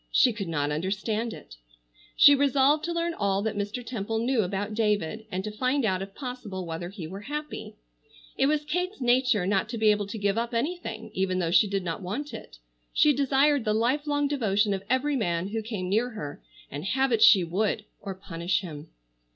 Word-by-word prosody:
She 250 - +4
could 205 -4 -5
not 145 -3 -1
understand 210 +8 -2
it. - - -11 0.6
She 285 - +8
resolved 280 +1 +3
to 340 - -2
learn 340 0 -1
all 200 -7 0
that 220 -1 -2
Mr. 205 +4 -3
Temple 225 -2 -3
knew 240 +1 +1
about 200 +2 -3
David, 210 -1 -1
and 185 0 -2
to 215 - -4
find 255 +4 0
out 190 -3 0
if 195 0 -7
possible 245 -9 -6
whether 170 +1 -5
he 190 -4 -8
were 190 +5 -7
happy. 300 +1 -5 0.6
It 270 - +2
was 300 0 +1
Kate's 360 +6 -2
nature 245 -5 +3
not 195 +2 +1
to 235 - -4
be 220 -1 +5
able 205 -1 0
to 210 - -6
give 205 +1 +1
up 235 0 -3
anything 230 -6 -3
even 190 -1 0
though 170 -2 0
she 180 +4 +5
did 195 -1 -2
not 170 0 -4
want 240 +11 -4
it. - - -9 0.3
She 300 - +4
desired 280 0 +3
the 215 -1 +1
life 260 +7 +1
long 290 0 +1
devotion 210 -7 +1
of 195 - -3
every 280 +3 +1
man 175 -6 -1
who 220 +1 -2
came 210 -4 -4
near 220 +6 +1
her, 150 -11 -7 0.3
and 145 +2 -5
have 265 +7 +1
it 225 -2 +2
she 200 -5 +8
would 205 +5 -1 0.2
or 195 -2 -5
punish 185 -1 -2
him. 155 -4 -8
215 Hz, 205 wpm, -27 LUFS, 190-260 Hz, 0.6 s, She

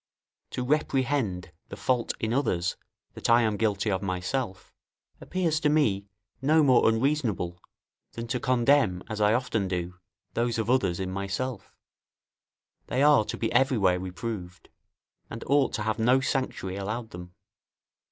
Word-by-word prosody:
To 125 - -3
reprehend 130 - 0 0.2
the - - -8
fault 125 -2 0
in 110 +1 -1
others 95 -9 0 0.4
that - - -4
I 120 +1 +6
am 110 -2 +1
guilty 105 0 0
of 95 -1 -1
myself, 95 +3 -3 0.5
appears 170 -4 -1
to 150 - +2
me 110 -10 +2 0.3
no 155 +3 +4
more 130 -5 +5
unreasonable, 115 - 0 0.5
than 115 - -5
to 125 - -1
condemn, 120 -6 +2
as 110 -1 -3
I 105 +1 +4
often 115 -5 -1
do, 90 -1 -4 0.3
those 120 0 0
of 110 +1 0
others 125 -10 +1
in 95 -1 -3
myself: 100 +4 -4 1.2
they 135 - +1
are 145 -6 +6
to - - -5
be 115 - -1
everywhere 115 -8 +3
reproved, 90 0 -6 0.6
and 115 - -7
ought 140 +1 +3
to 105 - -2
have 110 +1 -1
no 125 +4 +4
sanctuary 130 -8 -2
allowed 110 +4 -4
them. 90 0 -10
115 Hz, 145 wpm, -27 LUFS, 95-130 Hz, 1.2 s, I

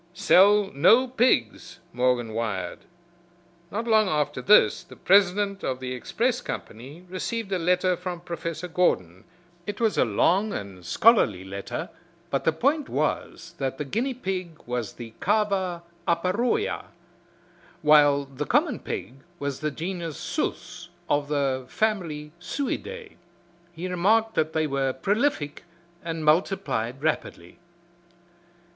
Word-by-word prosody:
"Sell 200 +1 +5
no 225 - +5
pigs," 245 - +1
Morgan 125 -2 +1
wired. 105 -6 -3 0.9
Not 225 +3 -4
long 215 -3 +4
after 150 -5 -1
this 210 +9 +5
the - - -14
president 200 +1 +3
of 130 -1 -2
the 130 -1 -4
express 235 - -1
company 135 +10 -8
received 200 +3 -4
a 190 - 0
letter 180 +1 +2
from 180 -1 -6
Professor 170 -1 -5
Gordon. 95 - 0 0.4
It 205 - -4
was 225 -2 +1
a - - +6
long 185 - +2
and 95 -3 -7
scholarly 105 - +4
letter, 100 +1 -5 0.4
but - - -1
the 160 - +4
point 280 - 0
was 165 - -2
that 135 -1 -2
the 150 - -3
guinea 245 - -1
pig 185 -7 -4
was 120 -3 -3
the 115 -2 -10
Cava 195 -4 0 0.2
aparoea 205 - 0 1.0
while 145 -2 +5
the 135 -1 -6
common - - +2
pig 130 - -6 0.2
was 140 -3 -4
the 155 - -1
genius 165 0 -5
Sus - - -4 0.2
of 145 0 +1
the 135 -3 0
family 165 -9 -2
Suidae. 415 - -4 0.5
He 175 +2 -6
remarked 215 +5 +2
that 155 0 0
they 160 -1 +1
were 135 -2 0
prolific 195 - -1 0.4
and 165 -2 -4
multiplied 150 - +1
rapidly. 150 - -3
170 Hz, 125 wpm, -25 LUFS, 135-205 Hz, 1.0 s, a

